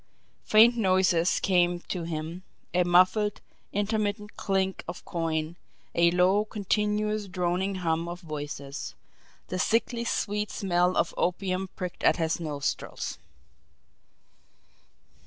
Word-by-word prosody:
Faint 225 +3 +7
noises 185 -5 +3
came 175 -2 +2
to 180 - -4
him, 165 +2 -4 0.3
a 180 0 +4
muffled, 185 +4 +3 0.3
intermittent 210 0 -1
clink 190 -1 -1
of 175 - -7
coin, 165 -1 -2 0.4
a 170 0 +5
low, 180 +4 +3
continuous, 210 0 -1
droning 185 +1 -1
hum 165 -2 -1
of 175 +1 -6
voices; 145 -3 -6 0.5
the 185 - -2
sickly 235 +3 +1
sweet 210 -2 -1
smell 180 -1 +1
of - - +1
opium 185 +1 -1
pricked 180 -2 -6
at - - +4
his 160 -1 0
nostrils. 145 - -3
185 Hz, 110 wpm, -28 LUFS, 170-205 Hz, 0.5 s, Faint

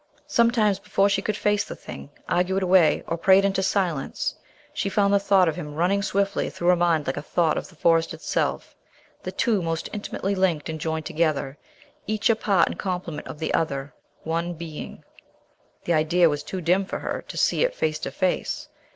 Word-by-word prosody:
Sometimes, 230 -7 +2
before 200 0 +1
she 200 - +1
could 215 -1 -2
face 205 0 +1
the - - -8
thing, 70 0 -10 0.2
argue 180 +2 +1
it 195 - 0
away, 180 -5 +4
or 170 - -2
pray 190 +2 +6
it 195 - +3
into 195 -1 +1
silence, 185 -7 -1 0.4
she 200 - -1
found 200 0 +2
the 200 - +5
thought 195 -2 +4
of 160 - 0
him 150 -1 -7
running 180 +5 +2
swiftly 200 0 0
through 175 - -1
her 180 - +6
mind 170 -3 +2
like 130 - -2
a - - -2
thought 160 +1 +1
of - - -4
the 185 - -18
Forest 165 +1 +2
itself, - - -2 0.5
the - - -5
two 220 -5 +1
most 165 -1 -3
intimately 200 -1 -3
linked 180 -6 0
and 160 -1 -5
joined 160 -1 -2
together, 155 -4 0 0.5
each 215 +1 +2
a - - +2
part 200 -5 +2
and - - -5
complement 180 -5 -4
of - - -7
the 160 - -3
other, 140 -3 -1 0.3
one 170 +2 -2
being. 160 -2 -8 0.8
The 170 - 0
idea 165 +2 +4
was 145 -1 -2
too 185 +5 -5
dim 180 +4 +2
for 190 - -5
her - - -4
to - - -8
see - - +2
it - - 0
face 155 -1 -1
to 135 - -4
face. 185 +6 -2
180 Hz, 205 wpm, -24 LUFS, 160-195 Hz, 0.8 s, pray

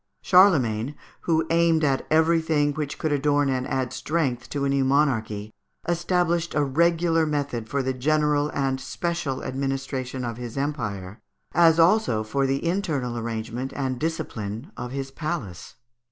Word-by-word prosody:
Charlemagne, 145 - +4 0.3
who 160 -1 +3
aimed 165 -1 +3
at 135 -2 +1
everything 160 -2 +3
which 150 -1 -4
could 155 - -1
adorn 145 0 +2
and 130 -1 -1
add 130 -1 -2
strength 135 -7 -2
to 140 -1 -2
a - - +1
new 135 0 +2
monarchy, 110 -7 +1 0.4
established 170 0 0
a 150 - +3
regular 165 +3 +2
method 140 -7 -2
for 140 -1 0
the 130 0 -1
general 150 +2 +1
and 135 -2 -1
special 170 -4 -3
administration 135 -1 -3
of 115 -1 -4
his 120 0 -7
empire, 110 -9 -3 0.3
as 165 -1 +5
also 165 - +3
for 135 +5 0
the 135 +4 -1
internal 160 -9 -1
arrangement 115 +3 -4
and 130 -3 -2
discipline 120 - -4
of 125 - -5
his 135 0 -4
palace. 135 - -5
140 Hz, 145 wpm, -25 LUFS, 125-160 Hz, 0.4 s, as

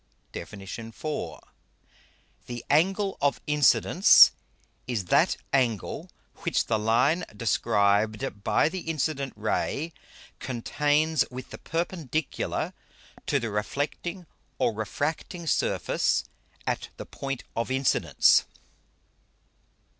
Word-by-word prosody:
DEFIN. 100 -2 -8
IV. 115 +3 -8
_The 125 -4 -9
Angle 190 +6 +2
of 140 0 +2
Incidence 150 -2 +6 0.6
is 115 -7 -2
that - - +3 0.2
Angle, 120 -7 0 0.3
which - - 0
the 110 -2 0
Line 125 +11 +2
described 105 -1 +1
by - - +3
the 185 +4 -3
incident 155 -4 -2
Ray 140 +9 -2 0.5
contains 150 +5 +1
with 130 0 -8
the - - -8
Perpendicular 165 -3 -2 0.5
to 140 - +2
the 115 -3 -3
reflecting 145 - -3 0.3
or - - +1
refracting 150 - -3
Surface - - +1 0.4
at - - -2
the - - -7
Point 135 -2 -5
of 115 +2 -1
Incidence. 130 0 +3
135 Hz, 95 wpm, -27 LUFS, 115-155 Hz, 0.6 s, Incidence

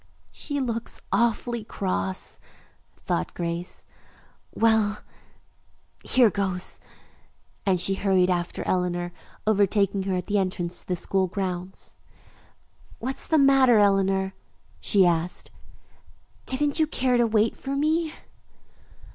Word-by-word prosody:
"She 285 -2 -4
looks 235 -3 -3
awfully 235 0 +1
cross," 95 - -2 0.6
thought 80 - -3
Grace. 170 0 -4 0.7
"Well, 220 -2 +2 1.0
here 245 -5 +4
goes," 190 -2 -2 0.9
and 185 -2 +3
she 195 - +3
hurried 190 -2 +2
after 175 -1 -2
Eleanor, 175 -1 -1 0.3
overtaking 200 -1 +2
her 185 - +1
at 180 - -2
the 205 -1 +1
entrance 180 -2 -2
to - - -17
the 180 - 0
school 190 +2 0
grounds. 185 -1 -5 1.0
"What's 260 +3 -4
the 320 - +3
matter, 270 -4 +6
Eleanor?" 195 -1 +2 0.5
she 195 -3 +4
asked. 170 0 -1 1.0
"Didn't 285 +4 +2
you 315 - +3
care 255 -4 +1
to 240 -1 +3
wait 220 0 +2
for 275 0 -4
me?" 310 +3 +1
200 Hz, 115 wpm, -25 LUFS, 180-235 Hz, 1.0 s, matter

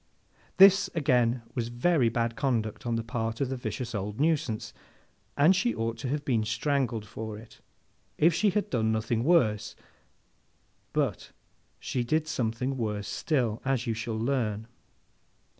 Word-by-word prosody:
This, 195 0 +7
again, 125 -5 +2
was 120 -3 -2
very 120 +2 +2
bad 115 0 -1
conduct 120 -3 -1
on 120 - 0
the 115 - -2
part 115 0 -3
of 135 -3 0
the 135 - -2
vicious 125 -1 -5
old 105 +1 -4
nuisance, 145 -8 0 0.6
and 160 +7 +6
she 240 +6 +1
ought 115 0 -2
to 130 - -4
have 145 +3 -2
been 115 -5 +1
strangled 120 -1 -1
for 110 +1 -6
it 115 +1 -15 0.6
if 165 +2 +4
she 205 +6 +3
had 205 +2 -1
done 110 -3 +1
nothing 110 +1 0
worse; 110 - +2 1.2
but, - - -1 0.5
she 125 - -2
did 155 +6 0
something 125 0 -2
worse 105 -3 -2
still, 120 -8 -1
as 135 -2 0
you 115 - 0
shall 115 0 -4
learn. 110 -3 -1
120 Hz, 150 wpm, -28 LUFS, 110-140 Hz, 1.2 s, This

